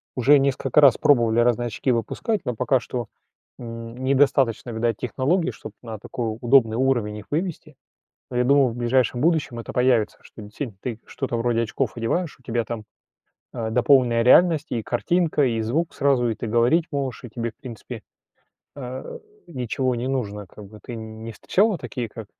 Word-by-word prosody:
уже 140 +3 +5
несколько 135 +1 +2
раз 140 -4 +6
пробовали 120 -5 +3
разные 120 0 +2
очки 125 +3 -1
выпускать, 205 - -1
но 125 - -2
пока 125 +2 +2
что, 120 -3 -5 0.5
н 115 -1 -8
недостаточно, 130 -2 +2
видать, 115 -1 -1
технологий, 140 +8 0
чтоб - - -10
на 115 -2 -6
такой 110 -1 -4
удобный 120 -3 +4
уровень 120 -5 0
их 105 - -10
вывести. 155 -2 -3 0.6
Но 125 - -2
я 125 - +3
думаю, 140 0 +4
в 115 - -7
ближайшем 120 +1 +1
будущем 155 -7 +1
это - - -7
появится, 125 -4 +2
что 110 - -13
десинь 105 +2 -7
ты 115 -3 -5
что-то 130 -3 -4
вроде 115 0 +1
очков 115 +1 -2
одеваешь, 150 +9 -2
у 130 - -26
тебя 115 0 -1
там, 110 -2 -6 0.7
а, 115 -2 -3
дополненная 120 -1 +3
реальность 160 +3 +5
и 115 - -1
картинка, 155 +5 +1
и 115 -2 0
звук 150 +10 -1
сразу. 135 -4 +2
И 110 - -2
ты - - -5
говорить 120 +9 +3
можешь, 135 -2 -3
и 120 - -8
тебе, 115 0 -4
в - - -42
принципе, 120 -5 -9 0.8
э, 130 -1 -7 0.3
ничего 130 -2 -2
не 120 +2 -3
нужно. 105 -7 -3
Как 100 +3 -13
бы 105 +1 -14
ты, 120 - -7
нь 110 0 -9
не 115 - -6
встречала 200 - +1
такие, 120 -6 -5
как, 110 0 -9
120 Hz, 180 wpm, -23 LUFS, 115-135 Hz, 0.8 s, раз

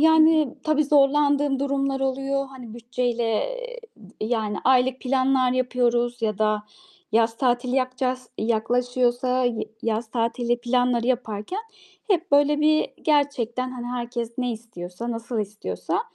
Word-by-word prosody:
yani 315 -3 +5
tabii 305 -1 +2
zorlandığım 285 0 +3
durumlar 275 -1 0
oluyor. 275 +1 -1
Hani 255 -4 -11
bütçeyle, 240 0 -2 0.3
eee, - - -8 0.2
d 210 -3 -17
yani 220 -2 -1
aylık 255 0 +3
planlar 260 -1 +2
yapıyoruz 245 -1 0
ya 215 -2 0
da 215 -1 +1 0.5
yaz 225 0 +3
tatili 250 0 +1
yapacağız, 255 -1 -1
yaklaşıyorsa 245 +3 +1
y 240 -3 -1
yaz 225 -1 -1
tatili 240 +1 0
planları 245 -1 +1
yaparken 245 - -2 0.5
hep 355 -6 +1
böyle 290 +1 +4
bir 310 +1 +3
gerçekten 255 -5 +1
hani 245 -1 -6
herkes 235 -1 -4
ne 250 -1 0
istiyorsa, 220 -1 -7
nasıl 230 -1 -3
istiyorsa, 210 - -3
250 Hz, 125 wpm, -24 LUFS, 235-275 Hz, 0.5 s, yani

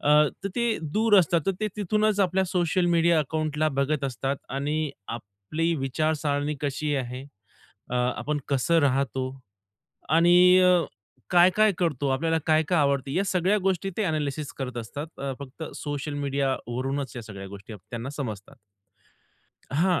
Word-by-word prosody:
अ, 145 - +1 0.3
तर - - 0
ते 235 -2 +1
दूर 215 +1 +4
असतात 170 -1 +3
तर 195 - +3
ते 215 - 0
तिथूनच 210 +1 +1
आपल्या 190 0 +2
सोशल 180 -1 +1
मीडिया 170 0 +4
अकाउंटला 155 0 0
बघत 140 +1 +1
असतात 135 +1 -2
आणि 150 +3 -1 0.2
आपली 115 +10 -3
विचारसरणी 145 +1 -1
कशी 145 +1 -1
आहे? 125 -1 -4 0.7
अ, - - -2
आपण 125 +4 0
कसं 145 +5 +2
राहतो? 135 -2 +1 0.8
आणि 175 +3 +6
अ, 180 -1 +5 0.5
काय-काय 185 +4 +5
करतो? 145 -6 0
आपल्याला 160 +5 +1
काय-काय 160 +2 +3
आवडते? 140 -2 +1
या 195 - +2
सगळ्या 185 +3 +2
गोष्टी 195 0 0
ते 220 - 0
एनालिसिस 150 -2 -2
करत 130 -2 -4
असतात. 140 +6 -6 0.3
फक्त 140 +3 -9
सोशल 145 0 -4
मीडिया 140 -1 0
वरूनच 130 +1 -3
या 120 - -5
सगळ्या 100 -3 -9
गोष्टी 100 +2 -10
त्यांना 115 +6 -7
समजतात. 110 -8 -6 1.2
हां, 175 +4 +2
150 Hz, 140 wpm, -26 LUFS, 135-175 Hz, 1.2 s, आणि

